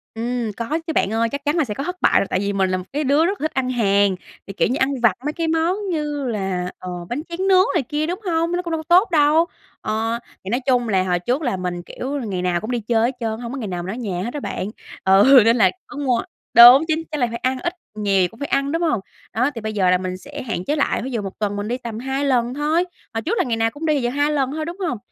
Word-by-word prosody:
Ừm, 235 0 -2
có 240 +8 -2
chứ 320 - -1
bạn 200 - +1
ơi, 230 +1 +1
chắc 280 +4 -6
chắn 295 - +1
là 320 - +3
sẽ 215 -6 -4
có 275 - -4
thất 360 +3 -5
bại - - +4
rồi, 195 - -1
tại 185 - 0
vì 200 +1 -1
mình 190 -1 +1
là 185 - 0
một 185 - -6
cái 295 +2 0
đứa 285 +4 +3
rất 390 0 -2
là 310 - +2
thích - - -24
ăn 255 -1 -1
hàng, 200 -5 +2 0.3
thì, 195 - -7
kiểu - - +1
như, 255 - -1
ăn 265 -1 0
vặt 235 -5 +5
mấy 300 - -1
cái 330 -1 -2
món 325 +3 +1
như 295 -4 -2
là, 190 -5 -2
ờ, 185 - -6 0.2
bánh 260 +5 -2
tráng 370 +3 -2
nướng 375 -1 +6
này 325 -6 +1
kia, 295 +5 -2
đúng 360 +4 -3
hông? 335 -1 0
Nó 355 0 0
cũng 340 -2 -6
đâu 320 -1 -2
có 345 +3 +6
tốt 385 -2 -5
đâu. 310 +2 +4 0.4
Ờ, 225 +2 -1 0.2
thì 190 - -6
nói 245 +4 +1
chung 245 -3 +2
là 190 -3 +2
hồi 180 -1 0
trước 245 - -1
là 245 -10 -1
mình, 180 -1 -3
kiểu, 270 +9 -5
là 265 - -4
ngày 190 -4 -3
nào 180 -1 0
cũng 220 +3 -4
đi 245 - 0
chơi 225 +1 +1
hết - - -20
trơn 230 - -1
á, - - -8
hổng 235 - -5
có 275 - -5
ngày 225 - -4
nào 175 -2 -4
mình 185 - -4
ở - - -8
nhà 190 -7 -3
hết 240 - -3
đó 295 - -3
bạn, 195 - -4 0.4
ừ, 205 +8 +7
nên 230 +2 +4
là 190 -4 +5 0.2
có 295 - -10
mua 255 -5 +1 0.3
đúng 245 +5 +10
chính 320 0 0
chắc 300 - -2
là 245 - +3
phải 235 0 -5
ăn, 255 +1 -1
ít 345 +7 -2 0.2
nhiều 205 -2 0
gì 180 - +3
cũng 225 +5 -18
phải 285 - -3
ăn, 275 +1 0
đúng 330 +1 -1
hông? 310 - +1 0.3
Đó, 250 +6 +2
thì 230 - -5
bây 215 0 -4
giờ 190 -3 +2
là 180 - +4
mình 185 0 -4
sẽ 285 +9 -9
hạn 215 -7 -4
chế 295 - 0
lại, 285 - 0
ví 265 - -5
dụ 230 -3 -2
1 195 -1 -7
tuần 205 -1 -1
mình 205 +1 -3
đi 245 +2 -1
tầm 230 -3 -6
2 270 +2 -2
lần 245 -3 +1
thôi, 310 +5 +1 0.3
hồi 225 - -2
trước 425 - -1
là - - +3
ngày 230 -3 -1
nào 225 0 +2
cũng 310 +2 -7
đi, 300 -3 +2
giờ 240 - 0
2 290 +3 +1
lần 275 -3 0
thôi, 310 +1 -3
đúng 340 +3 -6
hông? 250 - -2
250 Hz, 310 wpm, -21 LUFS, 210-295 Hz, 0.4 s, đúng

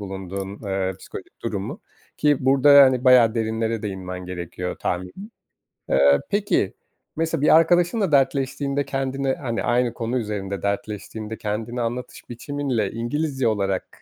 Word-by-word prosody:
bulunduğun, 95 0 -6
eee, 95 -1 -1
psikolojik - - -11
durumu. 105 - -4 0.4
Ki 150 -1 +3
burada, 140 +1 +7
hani, 130 -1 +3
bayağı 125 -3 +6
derinlere 110 0 -1
değinmen 90 -3 -5
gerekiyor 90 0 -5
tahminim. 90 - -4 0.6
Eee, 70 +1 +5
peki, 205 - +1 0.4
mesela 165 -1 -1
bir 150 - +6
arkadaşınla 175 +4 +3
dertleştiğinde 140 0 +1
kendine, 135 0 -1
hani, 120 -4 -3
aynı 120 0 +1
konu 120 +2 -2
üzerinde 100 -4 -4
dertleştiğinde 105 +2 -4
kendini 110 +3 -3
anlatış 120 +2 -5
biçiminle 125 -4 -2
İngilizce 135 +3 -1
olarak, 100 -3 -2
115 Hz, 125 wpm, -23 LUFS, 100-140 Hz, 0.6 s, burada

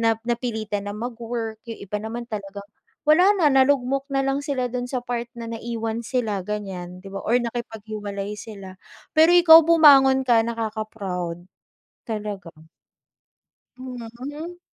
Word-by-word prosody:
nap 225 0 +1
napilitan 220 -4 -3
ng 205 - -5
mag-work, 230 -1 -5
yung 225 - -7
iba 210 +2 -4
naman 230 +3 -5
talagang 200 -3 -7 0.4
wala 310 +4 +6 0.2
na 325 - +4
nalugmok 270 0 +3
nalang 270 +1 0
sila 275 -4 -1
dun 245 0 -4
sa 255 - -1
part 240 -1 -4
na 230 - -6
naiiwan 230 0 -4
sila, 220 -5 -2
ganyan, 185 -3 -6
di 185 - -15
ba, 195 0 -6
or 235 +3 +2
nakipaghiwalay 215 -4 -5
sila. 200 -3 -10 0.4
Pero 320 +2 +6
ikaw 335 -2 +9
bumangon 275 -5 +6
ka, 230 -2 +5
nakaka-proud. 215 -6 -4 0.6
Talaga. 210 -5 -5 1.2
Mhm, 250 -3 -8
mhm. 310 +6 -7
230 Hz, 135 wpm, -23 LUFS, 210-255 Hz, 1.2 s, ikaw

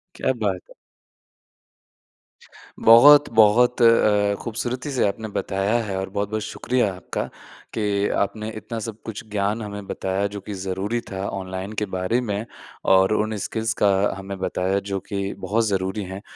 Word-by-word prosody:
क्या - - 0
बात 95 -3 0
है। - - -14 2.1
बहुत-बहुत 120 -2 +6
अ, - - +7
अ, 105 -3 +4
खूबसूरती 125 +4 -4
से 130 -6 +2
आपने 110 +2 -4
बताया 100 +4 0
है 95 -2 -3
और 95 0 -3
बहुत-बहुत 105 +2 -2
शुक्रिया 115 -1 -1
आपका 90 -1 -4 0.5
कि 105 -2 0 0.2
आपने 105 +2 -5
इतना 115 +1 -6
सब 110 0 -7
कुछ 110 -1 -6
ज्ञान 105 +2 0
हमें 100 -1 -6
बताया 95 +1 -2
जो 100 0 -7
कि 105 - -7
ज़रूरी 95 +4 -2
था 95 +1 -3
ऑनलाइन 95 +1 -5
के - - +1
बारे 95 +4 -1
में, 105 -2 -3 0.4
और 95 +2 +5
उन 110 0 0
स्किल्स 110 +3 -2
का 105 - +5 0.3
हमें 95 0 -6
बताया, 95 +1 0
जो 100 -1 -4
कि 100 0 -4
बहुत 110 +5 0
ज़रूरी 95 +1 -1
हैं। 95 +1 -7
100 Hz, 155 wpm, -23 LUFS, 95-110 Hz, 2.1 s, अ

